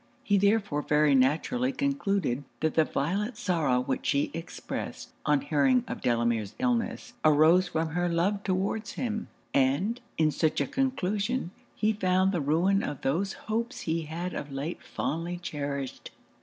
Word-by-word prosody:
He 200 Hz, -1 st, +3 dB
therefore 200 Hz, -6 st, +2 dB
very 150 Hz, -1 st, +3 dB
naturally 155 Hz, -, +2 dB
concluded 200 Hz, -, 0 dB, 0.2 s
that 160 Hz, -1 st, +1 dB
the 160 Hz, -, +4 dB
violent 200 Hz, -, -1 dB
sorrow 150 Hz, -9 st, +1 dB
which 130 Hz, 0 st, -2 dB
she 140 Hz, 0 st, +1 dB
expressed, 165 Hz, +1 st, -6 dB, 0.2 s
on 150 Hz, -2 st, +4 dB
hearing 140 Hz, -3 st, +3 dB
of -, -, -5 dB
Delamere's 115 Hz, -3 st, 0 dB
illness, 245 Hz, -2 st, -1 dB
arose 155 Hz, +4 st, +5 dB
from 160 Hz, -2 st, -1 dB
her 175 Hz, +2 st, 0 dB
love 185 Hz, +4 st, +1 dB
towards 195 Hz, +3 st, -1 dB
him; 220 Hz, -3 st, -3 dB, 0.3 s
and, 145 Hz, -, +2 dB, 0.2 s
in 155 Hz, -1 st, +3 dB
such 155 Hz, +1 st, +1 dB
a 140 Hz, -, +2 dB
conclusion, 225 Hz, -, -1 dB, 0.2 s
he 215 Hz, +1 st, +2 dB
found 185 Hz, -2 st, +2 dB
the 175 Hz, -5 st, 0 dB
ruin 175 Hz, +8 st, +2 dB
of 145 Hz, -, -4 dB
those 180 Hz, +8 st, 0 dB
hopes 230 Hz, +4 st, -2 dB
he 165 Hz, 0 st, -1 dB
had 170 Hz, +4 st, -4 dB
of 145 Hz, -, -5 dB
late 140 Hz, +5 st, -4 dB
fondly 170 Hz, +3 st, -3 dB
cherished. 140 Hz, -5 st, -4 dB
170 Hz, 150 wpm, -28 LUFS, 145-200 Hz, 0.3 s, arose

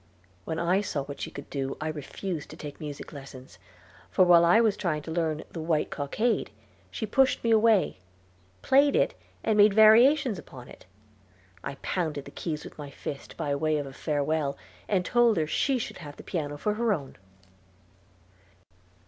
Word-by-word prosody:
When 160 Hz, -, -3 dB
I 175 Hz, +4 st, +2 dB
saw 150 Hz, -8 st, -3 dB
what 140 Hz, 0 st, -9 dB
she -, -, -3 dB
could 140 Hz, -, -9 dB
do, 135 Hz, -1 st, -3 dB
I 155 Hz, -, -3 dB
refused 155 Hz, +2 st, -5 dB
to -, -, -11 dB
take 145 Hz, -1 st, -8 dB
music 150 Hz, -3 st, -7 dB
lessons, 130 Hz, -9 st, -11 dB, 0.5 s
for 185 Hz, -, +4 dB
while 175 Hz, -1 st, +7 dB
I 175 Hz, +6 st, +6 dB
was 220 Hz, -3 st, +3 dB
trying 155 Hz, -7 st, -2 dB
to 160 Hz, -, -7 dB
learn 160 Hz, -2 st, -1 dB
"The 165 Hz, -, -6 dB
White 160 Hz, -1 st, 0 dB
Cockade," 210 Hz, -, -1 dB, 0.4 s
she 95 Hz, -, -4 dB
pushed 265 Hz, +5 st, +2 dB
me 230 Hz, -, +2 dB
away, 220 Hz, -, +3 dB, 0.6 s
played 280 Hz, +2 st, +4 dB
it, -, -, +2 dB, 0.3 s
and 215 Hz, -1 st, +1 dB
made 205 Hz, -1 st, +6 dB
variations 230 Hz, -, +6 dB
upon 125 Hz, -5 st, -12 dB
it. -, -, -15 dB, 0.8 s
I 140 Hz, -, -5 dB
pounded 155 Hz, -6 st, -2 dB
the -, -, -10 dB
keys 155 Hz, -3 st, -4 dB
with -, -, -12 dB
my 145 Hz, -1 st, -6 dB
fist, 140 Hz, 0 st, -8 dB
by 145 Hz, -, -1 dB
way 155 Hz, +2 st, +1 dB
of 145 Hz, -, -3 dB
a 135 Hz, -, -9 dB
farewell, 145 Hz, 0 st, -1 dB, 0.3 s
and 185 Hz, -3 st, +1 dB
told 240 Hz, -3 st, +3 dB
her 160 Hz, -, +2 dB
she 265 Hz, -, +1 dB
should 235 Hz, -, -5 dB
have 145 Hz, -3 st, -9 dB
the -, -, -11 dB
piano 145 Hz, -5 st, -3 dB
for 210 Hz, +8 st, -1 dB
her 225 Hz, 0 st, +1 dB
own. 140 Hz, -7 st, -6 dB
160 Hz, 180 wpm, -27 LUFS, 145-210 Hz, 0.8 s, while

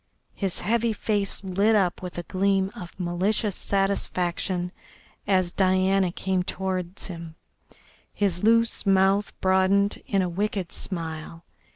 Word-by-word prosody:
His 195 Hz, -3 st, -2 dB
heavy 230 Hz, +3 st, +1 dB
face 205 Hz, -2 st, 0 dB
lit 200 Hz, +4 st, +2 dB
up 185 Hz, -4 st, +1 dB
with 180 Hz, -1 st, -7 dB
a 175 Hz, -, -3 dB
gleam 195 Hz, +2 st, +1 dB
of 180 Hz, -4 st, -10 dB
malicious 185 Hz, +3 st, 0 dB
satisfaction 185 Hz, -2 st, -1 dB, 0.6 s
as 185 Hz, -3 st, +2 dB
Diana 190 Hz, 0 st, +2 dB
came 185 Hz, +1 st, -1 dB
towards 185 Hz, 0 st, -3 dB
him, 165 Hz, -3 st, -7 dB, 0.8 s
his 195 Hz, -3 st, -1 dB
loose 230 Hz, +1 st, +3 dB
mouth 195 Hz, +1 st, +3 dB
broadened 190 Hz, +2 st, +2 dB
in 195 Hz, -2 st, +2 dB
a -, -, 0 dB
wicked 195 Hz, +1 st, -2 dB
smile. 165 Hz, -2 st, -5 dB
190 Hz, 125 wpm, -25 LUFS, 180-200 Hz, 0.8 s, loose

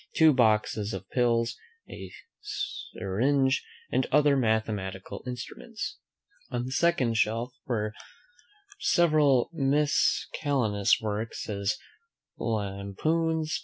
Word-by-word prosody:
Two 160 Hz, -2 st, +6 dB
boxes 110 Hz, -3 st, +2 dB
of 95 Hz, 0 st, -8 dB
pills. 120 Hz, -2 st, +2 dB, 0.3 s
A -, -, -9 dB, 0.3 s
syringe, 135 Hz, -, 0 dB, 0.3 s
and 130 Hz, -, +1 dB
other 145 Hz, 0 st, +5 dB
mathematical 110 Hz, -6 st, -1 dB
instruments. 125 Hz, -1 st, -6 dB, 0.5 s
On 120 Hz, 0 st, -2 dB
the 130 Hz, -, -5 dB
second 135 Hz, -7 st, +2 dB
shelf 115 Hz, +4 st, 0 dB, 0.2 s
are 105 Hz, -3 st, -1 dB, 0.9 s
several 150 Hz, -7 st, +3 dB
miscellaneous 140 Hz, -6 st, +2 dB
works, 110 Hz, +1 st, -3 dB
as 100 Hz, -1 st, -1 dB, 0.6 s
Lampoons. 120 Hz, -, -1 dB
120 Hz, 90 wpm, -28 LUFS, 105-145 Hz, 0.9 s, Two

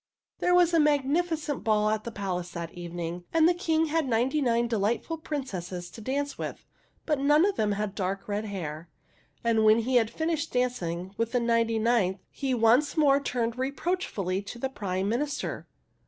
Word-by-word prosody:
There 355 Hz, -, +3 dB
was 350 Hz, -1 st, +4 dB
a 330 Hz, -, +5 dB
magnificent 300 Hz, +1 st, +1 dB
ball 215 Hz, -1 st, +2 dB
at 215 Hz, 0 st, -2 dB
the 235 Hz, -, -4 dB
palace 185 Hz, -4 st, -3 dB
that 170 Hz, -1 st, -5 dB
evening, 175 Hz, 0 st, -5 dB
and 325 Hz, 0 st, +5 dB
the 350 Hz, -, +4 dB
King 325 Hz, -2 st, +1 dB
had 320 Hz, -1 st, 0 dB
ninety 255 Hz, +6 st, +1 dB
nine 235 Hz, -2 st, +2 dB
delightful 235 Hz, +8 st, -1 dB
princesses 185 Hz, -, -5 dB
to 225 Hz, -, -10 dB
dance 280 Hz, +5 st, -2 dB
with, -, -, -5 dB, 0.4 s
but 300 Hz, -4 st, +1 dB
none 295 Hz, +4 st, +5 dB
of 405 Hz, -1 st, +1 dB
them 210 Hz, -1 st, +1 dB
had 205 Hz, -1 st, -2 dB
dark 195 Hz, 0 st, -3 dB
red 205 Hz, +1 st, -2 dB
hair, 170 Hz, -5 st, -5 dB, 0.5 s
and 230 Hz, -2 st, +3 dB
when 215 Hz, +1 st, +6 dB
he 250 Hz, +2 st, +2 dB
had 225 Hz, -2 st, +3 dB
finished 320 Hz, +2 st, -2 dB
dancing 190 Hz, -8 st, -1 dB
with 230 Hz, +1 st, -1 dB
the 245 Hz, -, +3 dB
ninety 230 Hz, -1 st, +2 dB
ninth 220 Hz, -4 st, +2 dB
he 270 Hz, -2 st, -1 dB
once 245 Hz, +7 st, +3 dB
more 280 Hz, -2 st, +5 dB
turned 240 Hz, -3 st, -2 dB
reproachfully 260 Hz, -, -1 dB
to 205 Hz, +4 st, -8 dB
the 265 Hz, +3 st, -2 dB
Prime 195 Hz, -5 st, -2 dB
Minister. 275 Hz, +7 st, -2 dB
235 Hz, 180 wpm, -28 LUFS, 200-290 Hz, 0.5 s, when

